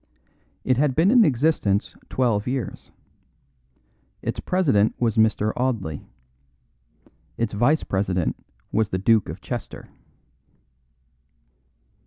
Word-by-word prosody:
It 130 -1 +1
had 140 -2 +1
been 170 +6 +4
in 245 -2 +6
existence 125 - +1
twelve 115 -5 0
years. 130 -1 -4 1.3
Its - - -3
president 135 - +2
was 115 -3 +1
Mr. 110 -1 +2
Audley. 110 - -2 1.3
Its 115 -2 -2
vice 120 +9 +2
president 95 -3 -1 0.4
was 110 -2 +1
the 95 - -1
Duke 110 +2 +2
of - - -7
Chester. - - -7
115 Hz, 100 wpm, -23 LUFS, 105-135 Hz, 1.3 s, in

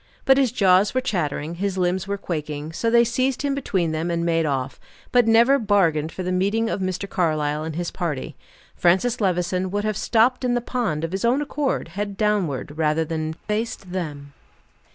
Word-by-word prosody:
But 270 0 +5
his 260 -4 +2
jaws 195 -1 +3
were - - +4
chattering, 165 - -2
his 200 -2 -1
limbs 185 +1 0
were 200 0 -2
quaking, 150 -4 -4
so 230 - 0
they 235 +1 +5
seized 255 +4 0
him 285 -1 0
between 190 - -1
them, 160 +2 -2
and 170 0 -1
made 165 -2 +1
off, 135 -1 -2 0.3
but 245 -2 +4
never 235 +5 +5
bargained 170 -8 +2
for 185 - -5
the 180 - -2
meeting 205 +5 +1
of - - -2
Mr. 185 +1 -2
Carlyle 155 -4 0
and 160 -1 -5
his 175 0 -3
party. 155 -7 -4 0.4
Francis 220 +8 +2
Levison 185 -1 0
would 205 +2 -2
have 215 -1 -1
stopped 240 +5 +2
in 245 -1 +1
the - - +2
pond, 230 - -2
of 165 - -2
his 190 +1 -3
own 240 +4 +3
accord, 295 -1 -2
head 200 0 -4
downward, 175 - -1
rather 155 +1 +2
than 155 0 -3
face 215 +6 -3
them. 155 -7 -6
185 Hz, 195 wpm, -23 LUFS, 160-225 Hz, 0.4 s, But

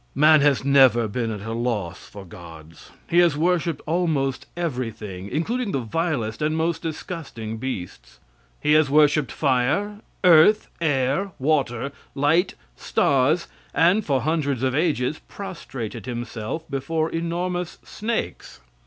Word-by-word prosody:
Man 155 +2 +6
has 140 -2 +2
never 130 -5 +5
been 115 +2 -2
at 105 -2 -5
a 115 - -3
loss 115 -7 -3
for 100 -1 -10
gods. 80 -4 -13 0.2
He 170 - +3
has 170 -4 +4
worshiped 170 -1 0
almost 155 -5 0
everything, 115 - -4
including 220 - -2
the 135 - +1
vilest 120 -2 -2
and 155 +1 0
most 165 0 0
disgusting 150 -9 -6
beasts. 90 - -6 0.4
He 150 - +1
has 155 -2 +4
worshiped 150 -1 +3
fire, 145 +10 0 0.3
earth, 180 +4 +6
air, 145 +5 0
water, 135 -3 0 0.2
light, 160 +7 +2 0.2
stars, 140 +5 +1 0.3
and 180 +6 +4
for 135 -6 0
hundreds 145 -5 -1
of 130 -1 +1
ages, 150 -2 0
prostrated 130 - -7
himself 120 +3 -4
before 155 +3 -2
enormous 175 +1 -3
snakes. 215 - -4
145 Hz, 125 wpm, -23 LUFS, 120-165 Hz, 0.4 s, Man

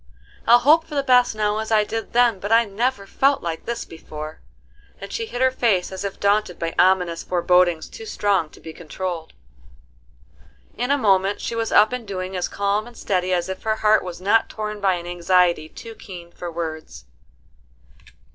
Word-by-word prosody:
I'll 235 - +8
hope 310 +6 +4
for 305 - -8
the 280 - +1
best 250 -3 +4
now 210 0 0
as 220 - -4
I 215 -1 +4
did 225 +2 -5
then, 240 -4 +3
but 205 +3 -5
I 230 +1 +5
never 215 +1 -2
felt 275 +7 +1
like 165 -1 -4
this 235 0 -4
before," 155 -1 -9 0.6
and - - -8
she 455 -1 -3
hid 245 - -5
her 260 - +4
face 220 -9 +1
as 190 0 -6
if 200 -1 -5
daunted 205 -2 +1
by 165 0 -3
ominous 180 -2 +3
forebodings 180 -2 +2
too 225 - -10
strong 200 -6 0
to - - -17
be 160 - -10
controlled. 170 0 -6 1.4
In 245 +2 -2
a 285 - +3
moment 195 -4 +2
she - - -4
was 230 -1 -2
up 215 +3 +5
and 245 -3 -5
doing 185 -1 -5
as 180 - -1
calm 200 +2 -1
and 240 - -14
steady 185 -1 -1
as 175 -1 0
if 190 0 -6
her 220 0 0
heart 215 0 +3
was 180 -2 -7
not 205 +5 +2
torn 210 -1 -5
by 190 -2 +2
an 175 -1 -7
anxiety 175 -2 +1
too 230 +6 -10
keen 175 -5 -11
for 175 0 -7
words. 160 - -6
200 Hz, 195 wpm, -22 LUFS, 175-225 Hz, 1.4 s, I'll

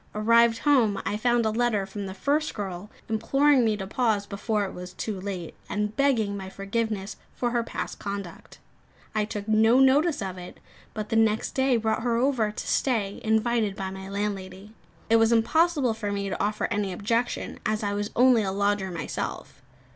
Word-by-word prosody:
Arrived 230 +2 +4
home, 235 -7 +3
I - - -1
found 240 +1 +2
a 220 - +2
letter 220 -3 +1
from 195 +1 -6
the 190 - -7
first 295 +8 0
girl 195 -1 -5 0.2
imploring 275 +5 +3
me 220 -2 +1
to 195 - -5
pause 215 -2 0
before 210 +1 -1
it 190 - -7
was 180 0 -8
too 195 0 -4
late, 185 -4 -5 0.2
and 210 +1 -2
begging 235 -8 +2
my 190 -1 -6
forgiveness 200 +1 -3 0.2
for 240 -1 -1
her 240 -1 +1
past 230 - -5
conduct. 200 -4 -7 0.6
I 215 -1 +1
took 210 -1 -6
no 220 +2 +4
notice 285 +4 +4
of 190 -3 -5
it; 180 - -10 0.4
but 215 -1 -4
the - - -1
next 220 -1 +2
day 265 -2 +2
brought 220 -1 0
her 235 -1 0
over, 245 -4 +2
to - - -7
stay, 215 -7 0
invited 220 -1 +1
by 190 -1 -4
my 190 0 -8
landlady. 200 0 -4 0.3
It 230 - +5
was 225 0 +4
impossible 275 +3 +3
for 215 -2 -4
me 200 -1 -2
to - - -2
offer 210 +1 0
any 205 -2 -1
objection, 230 +6 -2
as 215 0 -1
I 205 0 -1
was 205 +1 -2
only 250 -1 +5
a 195 -2 -1
lodger 200 0 0
myself. 170 -2 -5
215 Hz, 185 wpm, -26 LUFS, 200-235 Hz, 0.6 s, It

